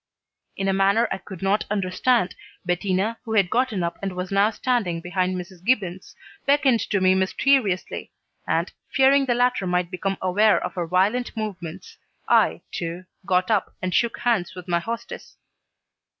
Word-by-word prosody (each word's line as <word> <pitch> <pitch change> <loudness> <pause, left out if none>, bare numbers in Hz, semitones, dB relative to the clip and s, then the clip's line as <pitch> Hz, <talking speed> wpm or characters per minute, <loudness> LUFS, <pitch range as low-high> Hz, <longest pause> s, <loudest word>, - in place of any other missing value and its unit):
In 195 - -2
a 195 - +2
manner 200 +4 +3
I 190 - -2
could 190 -1 -10
not 195 +2 +2
understand, 195 +2 +1 0.3
Bettina, 190 +5 0
who 225 -2 -5
had 195 -5 +3
gotten 230 -6 +1
up 170 - -3
and 195 -1 -3
was 180 +1 -5
now 200 +2 +4
standing 220 -7 -1
behind 185 +2 -1
Mrs. 180 0 -8
Gibbons, 190 -5 -1 0.3
beckoned 275 -4 +4
to 200 - +1
me 185 0 +4
mysteriously, 190 +1 +1 0.4
and, - - 0 0.2
fearing 270 +1 +4
the 245 - +2
latter 245 -5 +1
might 180 0 0
become 195 +1 -2
aware 205 +4 +3
of 180 - -5
her 175 -2 -3
violent 205 +8 +1
movements, 185 -7 -6 0.3
I, 80 - +3
too, 170 +2 -5 0.2
got 185 +2 +2
up 210 -3 0
and 185 -1 -3
shook 235 +3 +1
hands 215 -8 0
with 180 0 -9
my 170 -1 +1
hostess. 230 +6 -7
195 Hz, 165 wpm, -24 LUFS, 180-230 Hz, 0.4 s, now